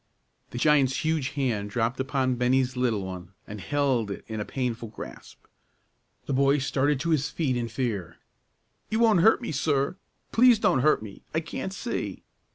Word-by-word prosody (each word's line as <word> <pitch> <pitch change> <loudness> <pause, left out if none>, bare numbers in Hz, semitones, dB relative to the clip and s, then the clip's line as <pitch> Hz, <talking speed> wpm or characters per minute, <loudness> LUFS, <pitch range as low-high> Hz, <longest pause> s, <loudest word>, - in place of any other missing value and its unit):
The - - -7
giant's 140 0 +3
huge 155 -4 0
hand 110 -7 -1
dropped 115 +3 -1
upon 130 -1 0
Bennie's 125 +1 +1
little 115 -6 0
one, 90 -1 -8
and 105 -1 -8
held 135 -6 0
it 100 - -6
in 110 -1 -4
a 105 - -3
painful 120 -3 -3
grasp. 105 - -11 0.8
The 140 - -2
boy 140 +2 +3
started 135 +1 +1
to 170 - -1
his 145 -1 +1
feet 150 -5 -1
in 120 -1 -1
fear. 115 -7 -3 0.7
"You 220 - 0
won't 225 -6 +4
hurt 225 +6 +5
me, - - -3
sir! 140 +2 0 0.3
Please 245 0 +6
don't 165 - +2
hurt 150 -4 +3
me; 100 -3 -10
I - - +3
can't 165 +3 -5
see!" 235 +5 -4
130 Hz, 170 wpm, -26 LUFS, 115-150 Hz, 0.8 s, Please